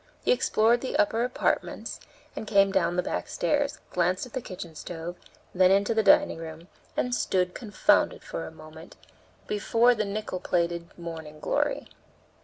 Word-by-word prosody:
He -, -, +4 dB
explored 235 Hz, -, +3 dB
the 265 Hz, -, -2 dB
upper 300 Hz, -7 st, +2 dB
apartments 250 Hz, +1 st, -1 dB, 0.4 s
and 220 Hz, -, -6 dB
came 195 Hz, -1 st, +4 dB
down 190 Hz, -2 st, +1 dB
the 180 Hz, -, +1 dB
back -, -, -3 dB
stairs, 290 Hz, -1 st, 0 dB
glanced 180 Hz, +3 st, +1 dB
at 250 Hz, -, -14 dB
the 260 Hz, -, -2 dB
kitchen 180 Hz, -5 st, -8 dB
stove, 170 Hz, +2 st, -6 dB, 0.4 s
then 185 Hz, 0 st, +5 dB
into 200 Hz, +3 st, +3 dB
the 220 Hz, -, +3 dB
dining 195 Hz, -5 st, +4 dB
room, 165 Hz, +2 st, -9 dB, 0.3 s
and 250 Hz, -, 0 dB
stood 180 Hz, -6 st, +1 dB
confounded, 210 Hz, -5 st, +2 dB
for 80 Hz, 0 st, -5 dB
a -, -, -9 dB
moment, 155 Hz, +1 st, -13 dB, 0.5 s
before 230 Hz, +4 st, +3 dB
the 215 Hz, -2 st, -1 dB
nickel 205 Hz, -2 st, -4 dB
plated 170 Hz, -1 st, -1 dB
'Morning 160 Hz, -3 st, -8 dB
Glory.' -, -, -1 dB
185 Hz, 160 wpm, -27 LUFS, 170-225 Hz, 0.5 s, then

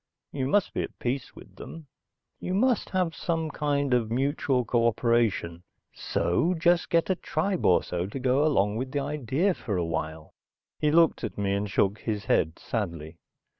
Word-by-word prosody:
You 130 Hz, -2 st, -2 dB
must 205 Hz, +7 st, +1 dB
be -, -, -1 dB
at -, -, -6 dB
peace 125 Hz, +1 st, -3 dB
with -, -, -15 dB
them. 165 Hz, -1 st, -9 dB, 0.5 s
You 180 Hz, -, -3 dB
must 245 Hz, +2 st, +2 dB
have 180 Hz, -3 st, 0 dB
some 160 Hz, -2 st, -2 dB
kind 145 Hz, -3 st, 0 dB
of 120 Hz, -3 st, +1 dB
mutual 130 Hz, 0 st, 0 dB
cooperation. 115 Hz, -6 st, +1 dB, 0.3 s
So 160 Hz, -, 0 dB
just 170 Hz, +1 st, +2 dB
get 165 Hz, +2 st, +2 dB
a -, -, +2 dB
tribe 190 Hz, +1 st, -1 dB
or 90 Hz, -, +4 dB
so 90 Hz, +1 st, -3 dB
to 105 Hz, -, -6 dB
go 130 Hz, +3 st, +2 dB
along 105 Hz, -9 st, +2 dB
with 130 Hz, +2 st, -4 dB
the 145 Hz, -, +1 dB
idea 150 Hz, -, 0 dB
for 105 Hz, -, -4 dB
a 85 Hz, -, 0 dB
while." 80 Hz, -1 st, -4 dB, 0.5 s
He 150 Hz, -, +2 dB
looked 165 Hz, -2 st, +3 dB
at 110 Hz, -, -4 dB
me 100 Hz, -1 st, 0 dB
and 100 Hz, +1 st, -1 dB
shook 100 Hz, +1 st, +1 dB
his 105 Hz, -2 st, -3 dB
head 80 Hz, +1 st, +1 dB
sadly. 85 Hz, -7 st, -4 dB
125 Hz, 175 wpm, -27 LUFS, 100-160 Hz, 0.5 s, or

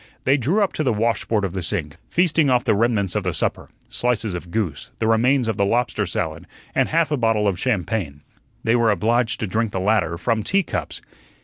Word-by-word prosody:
They 135 Hz, -, +4 dB
drew 160 Hz, -, +1 dB
up 195 Hz, -, -1 dB
to 155 Hz, -, -1 dB
the 130 Hz, -, +2 dB
washboard 110 Hz, -1 st, 0 dB
of 90 Hz, -, -4 dB
the 95 Hz, -, -3 dB
sink, 80 Hz, -3 st, -3 dB
feasting 165 Hz, -4 st, +2 dB
off 125 Hz, 0 st, +2 dB
the 115 Hz, -, +3 dB
remnants 105 Hz, -3 st, +1 dB
of -, -, 0 dB
the -, -, -2 dB
supper, -, -, -2 dB, 0.2 s
slices 115 Hz, -4 st, -1 dB
of 90 Hz, 0 st, -6 dB
goose, 85 Hz, -7 st, -3 dB
the 110 Hz, -, -1 dB
remains 120 Hz, +3 st, +3 dB
of 110 Hz, -3 st, -1 dB
the 100 Hz, -, +2 dB
lobster 115 Hz, +4 st, 0 dB
salad, -, -, -3 dB, 0.3 s
and -, -, +1 dB
half 165 Hz, -1 st, +1 dB
a 150 Hz, -, +1 dB
bottle 115 Hz, -3 st, +2 dB
of 95 Hz, -3 st, 0 dB
champagne. 95 Hz, -, -2 dB, 0.4 s
They 115 Hz, -, +2 dB
were 115 Hz, -2 st, +3 dB
obliged 110 Hz, +3 st, +1 dB
to -, -, 0 dB
drink 110 Hz, +2 st, -1 dB
the 95 Hz, -, -1 dB
latter 95 Hz, -4 st, +1 dB
from 115 Hz, +4 st, 0 dB
teacups. 195 Hz, -, -2 dB
110 Hz, 210 wpm, -22 LUFS, 100-125 Hz, 0.4 s, They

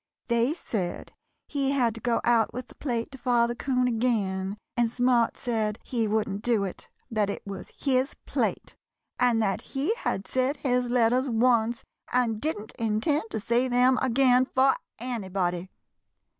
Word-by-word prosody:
They 235 Hz, +5 st, +2 dB
said 190 Hz, -, -4 dB, 0.3 s
he 275 Hz, -2 st, 0 dB
had 245 Hz, -5 st, +2 dB
to 225 Hz, -, -9 dB
go 240 Hz, -1 st, +1 dB
out 235 Hz, -2 st, +2 dB
with 250 Hz, -, -6 dB
the -, -, -13 dB
plate 240 Hz, -4 st, -3 dB
to 270 Hz, -, -9 dB
Father 240 Hz, -1 st, +2 dB
'Coon 250 Hz, 0 st, 0 dB
again, 210 Hz, -5 st, 0 dB, 0.2 s
and 235 Hz, -1 st, +2 dB
Smart 245 Hz, -1 st, +2 dB
said 220 Hz, -3 st, -1 dB
he 230 Hz, -3 st, -1 dB
wouldn't 210 Hz, -2 st, -1 dB
do 230 Hz, -3 st, +2 dB
it; 190 Hz, -, -6 dB, 0.2 s
that 210 Hz, -2 st, +1 dB
it 200 Hz, -, -5 dB
was 200 Hz, -1 st, -7 dB
his 265 Hz, 0 st, +1 dB
plate, -, -, -2 dB, 0.4 s
and 245 Hz, -2 st, +3 dB
that 195 Hz, -2 st, 0 dB, 0.2 s
he 295 Hz, +11 st, +2 dB
had 205 Hz, -, -3 dB
said 260 Hz, +5 st, 0 dB
his 250 Hz, -2 st, 0 dB
letters 245 Hz, +2 st, +2 dB
once 235 Hz, 0 st, +2 dB, 0.3 s
and 235 Hz, -4 st, +1 dB
didn't 220 Hz, -9 st, -3 dB
intend 225 Hz, +6 st, +1 dB
to 220 Hz, -, -3 dB
say 235 Hz, +4 st, +1 dB
them 250 Hz, +1 st, +3 dB
again 255 Hz, 0 st, +4 dB
for 265 Hz, +1 st, +4 dB, 0.2 s
anybody. 190 Hz, -7 st, -2 dB
240 Hz, 155 wpm, -27 LUFS, 220-255 Hz, 0.4 s, again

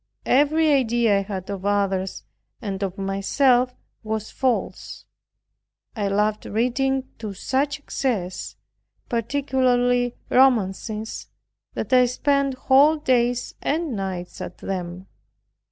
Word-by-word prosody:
Every 305 Hz, +3 st, +3 dB
idea 235 Hz, -6 st, +3 dB
I -, -, -1 dB
had 195 Hz, -2 st, -5 dB
of 195 Hz, -2 st, -5 dB
others 195 Hz, -2 st, 0 dB, 0.4 s
and 200 Hz, -4 st, -4 dB
of 195 Hz, 0 st, -3 dB
myself 245 Hz, +6 st, +2 dB, 0.3 s
was 220 Hz, -1 st, -4 dB
false. 255 Hz, -3 st, -2 dB, 0.9 s
I 205 Hz, -3 st, -1 dB
loved 210 Hz, +2 st, 0 dB
reading 260 Hz, +4 st, 0 dB
to 210 Hz, -3 st, -6 dB
such 275 Hz, +8 st, -1 dB
excess, 230 Hz, -10 st, -3 dB, 0.5 s
particularly 245 Hz, 0 st, +1 dB, 0.2 s
romances, 220 Hz, -3 st, +1 dB, 0.5 s
that -, -, -3 dB
I 250 Hz, -1 st, +6 dB
spent 275 Hz, +2 st, +1 dB
whole 275 Hz, +4 st, +5 dB
days 245 Hz, -5 st, +1 dB
and 310 Hz, -3 st, -1 dB
nights 190 Hz, -3 st, -5 dB
at 180 Hz, -, -7 dB
them. 180 Hz, -1 st, -5 dB
240 Hz, 105 wpm, -23 LUFS, 200-265 Hz, 0.9 s, I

